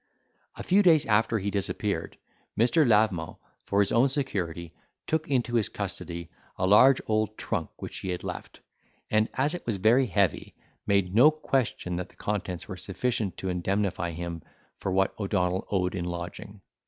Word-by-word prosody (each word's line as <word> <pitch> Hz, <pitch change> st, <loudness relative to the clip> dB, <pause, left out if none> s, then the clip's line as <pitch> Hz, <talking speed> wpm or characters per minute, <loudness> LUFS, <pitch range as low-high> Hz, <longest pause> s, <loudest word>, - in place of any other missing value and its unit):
A -, -, -7 dB
few 195 Hz, +3 st, +4 dB
days 165 Hz, -6 st, +5 dB
after 115 Hz, +1 st, +2 dB
he 100 Hz, 0 st, -2 dB
disappeared, 100 Hz, -2 st, -3 dB, 0.4 s
Mr. 125 Hz, +6 st, +4 dB
Lavement, 105 Hz, -7 st, +2 dB, 0.3 s
for 100 Hz, 0 st, +3 dB
his 100 Hz, -, +1 dB
own 120 Hz, +4 st, +4 dB
security, 90 Hz, -, -3 dB, 0.3 s
took 160 Hz, -1 st, -1 dB
into 125 Hz, -3 st, 0 dB
his 115 Hz, -4 st, +2 dB
custody 85 Hz, -1 st, -5 dB, 0.3 s
a 95 Hz, -, 0 dB
large 125 Hz, +7 st, +6 dB
old 110 Hz, 0 st, 0 dB
trunk -, -, -3 dB
which -, -, -6 dB
he 95 Hz, -, -5 dB
had 90 Hz, -1 st, -3 dB
left; -, -, -7 dB, 0.5 s
and 110 Hz, +1 st, +3 dB
as 140 Hz, +5 st, +1 dB
it 175 Hz, -, -5 dB
was 110 Hz, -4 st, 0 dB
very 120 Hz, +7 st, +4 dB
heavy, 95 Hz, -3 st, 0 dB, 0.3 s
made 100 Hz, -2 st, +2 dB
no 125 Hz, +8 st, +7 dB
question 135 Hz, -, -1 dB
that 90 Hz, 0 st, -5 dB
the -, -, -22 dB
contents 95 Hz, -4 st, -4 dB
were 95 Hz, -, -6 dB
sufficient 105 Hz, +1 st, -2 dB
to 95 Hz, -, -3 dB
indemnify 90 Hz, 0 st, -1 dB
him 85 Hz, 0 st, -5 dB, 0.3 s
for 95 Hz, -, -4 dB
what 95 Hz, +1 st, +2 dB
O'Donnell 95 Hz, -2 st, 0 dB
owed 90 Hz, -2 st, 0 dB
in 90 Hz, -2 st, -3 dB
lodging. 90 Hz, +4 st, -7 dB
100 Hz, 165 wpm, -27 LUFS, 90-115 Hz, 0.5 s, no